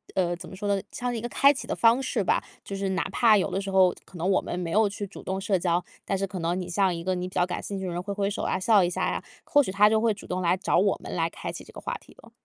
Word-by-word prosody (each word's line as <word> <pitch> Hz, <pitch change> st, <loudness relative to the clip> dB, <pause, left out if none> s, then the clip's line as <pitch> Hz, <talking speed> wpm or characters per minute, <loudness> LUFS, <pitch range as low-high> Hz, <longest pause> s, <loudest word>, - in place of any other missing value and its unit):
呃， 175 Hz, -2 st, +1 dB
怎 175 Hz, -, -10 dB
么 190 Hz, -, -9 dB
说 205 Hz, +2 st, -4 dB
呢， 195 Hz, -, 0 dB
像 245 Hz, -1 st, -3 dB
一 225 Hz, -, -3 dB
个 240 Hz, -, -4 dB
开 280 Hz, +3 st, +5 dB
启 270 Hz, -, -7 dB
的 -, -, -2 dB
方 235 Hz, +3 st, +4 dB
式 245 Hz, -5 st, -1 dB
吧。 -, -, +1 dB, 0.2 s
就 200 Hz, -, -6 dB
是 195 Hz, 0 st, -2 dB
哪 190 Hz, 0 st, 0 dB
怕 220 Hz, 0 st, +5 dB
有 190 Hz, -, 0 dB
的 195 Hz, -, -1 dB
时 195 Hz, -, -5 dB
候 185 Hz, -2 st, +5 dB
可 185 Hz, -, -13 dB
能 175 Hz, +3 st, -1 dB
我 190 Hz, -, +3 dB
们 175 Hz, -, -4 dB
没 170 Hz, -2 st, -3 dB
有 215 Hz, +2 st, +4 dB
去 205 Hz, +1 st, -5 dB
主 195 Hz, -, -11 dB
动 190 Hz, 0 st, -2 dB
社 195 Hz, 0 st, +1 dB
交， 175 Hz, 0 st, +1 dB, 0.2 s
但 195 Hz, -, 0 dB
是 195 Hz, -, 0 dB
可 190 Hz, -1 st, -6 dB
能 170 Hz, +2 st, -1 dB
你 180 Hz, -, -5 dB
向 190 Hz, +1 st, +2 dB
一 170 Hz, -, -5 dB
个 185 Hz, +1 st, 0 dB
你 180 Hz, 0 st, -3 dB
比 -, -, -19 dB
较 175 Hz, -, +3 dB
感 180 Hz, -, -4 dB
兴 200 Hz, -, -4 dB
趣 190 Hz, -, -4 dB
的 180 Hz, -, -3 dB
人 175 Hz, -, -2 dB
挥 200 Hz, +2 st, -4 dB
挥 200 Hz, 0 st, 0 dB
手 205 Hz, -, -4 dB
啊， -, -, 0 dB
笑 205 Hz, 0 st, +5 dB
一 175 Hz, -, +1 dB
下 -, -, -1 dB
呀， -, -, -3 dB, 0.2 s
或 290 Hz, -, +5 dB
许 190 Hz, -, -3 dB
他 205 Hz, +2 st, +5 dB
就 220 Hz, 0 st, +2 dB
会 225 Hz, -1 st, +3 dB
主 200 Hz, -, -12 dB
动 185 Hz, +1 st, -2 dB
来 180 Hz, +1 st, +2 dB
找 190 Hz, -, +1 dB
我 195 Hz, +2 st, +2 dB
们 -, -, -5 dB
来 165 Hz, -1 st, +1 dB
开 -, -, -6 dB
启 -, -, -8 dB
这 -, -, -15 dB
个 -, -, -10 dB
话 -, -, -4 dB
题 -, -, -18 dB
了。 -, -, -17 dB
195 Hz, 365 characters per minute, -26 LUFS, 180-205 Hz, 0.2 s, 开